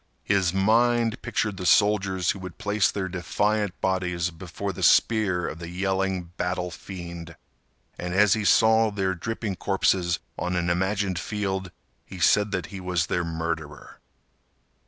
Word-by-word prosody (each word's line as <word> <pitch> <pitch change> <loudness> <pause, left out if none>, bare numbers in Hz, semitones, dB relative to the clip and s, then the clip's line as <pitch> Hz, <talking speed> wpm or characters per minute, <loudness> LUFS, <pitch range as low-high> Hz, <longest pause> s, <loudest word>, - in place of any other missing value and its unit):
His 95 -3 +2
mind 115 +4 +2
pictured 105 -4 -2
the 90 - -5
soldiers 95 -4 +3
who 100 - -7
would 90 -2 -8
place 105 -1 +1
their 95 -2 -3
defiant 100 +2 -1
bodies 90 -2 0
before 95 +3 -6
the - - -8
spear 100 -6 +3
of 80 - -6
the 85 0 -7
yelling 95 -1 -1
battle 90 0 -2
fiend, 85 -2 -8 0.6
and 90 - -4
as 105 0 +5
he 110 -1 -1
saw 110 +2 +5
their 95 -2 -1
dripping 105 +1 -4
corpses 85 -2 +1 0.2
on 90 +1 -2
an 85 0 0
imagined 95 0 0
field, 95 -2 -3 0.3
he 95 - -11
said 105 +4 +3
that 95 -4 -2
he 95 - -5
was 90 -3 0
their 90 - -1
murderer. 80 -3 -5
95 Hz, 150 wpm, -25 LUFS, 90-105 Hz, 0.6 s, as